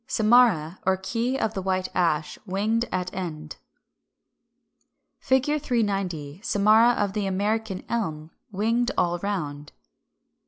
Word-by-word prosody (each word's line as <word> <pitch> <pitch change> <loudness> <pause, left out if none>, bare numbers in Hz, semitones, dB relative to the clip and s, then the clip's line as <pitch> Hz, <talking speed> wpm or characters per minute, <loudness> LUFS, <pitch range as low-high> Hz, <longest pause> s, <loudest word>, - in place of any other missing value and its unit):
Samara 215 -8 +3
or 190 0 +2
key 235 +7 -2
of 220 -5 -1
the 195 - -3
White 185 0 -1
Ash, 155 -3 0
winged 215 +5 0
at 180 0 -2
end. 155 -4 -6 1.6
390. 205 - -1
Samara 215 +3 +4
of 205 -4 -1
the 205 -2 -1
American 205 +1 -1
Elm, 160 -9 -3 0.2
winged 230 +5 0
all 175 0 +1
round. 150 -7 -4
195 Hz, 110 wpm, -25 LUFS, 175-225 Hz, 1.6 s, Samara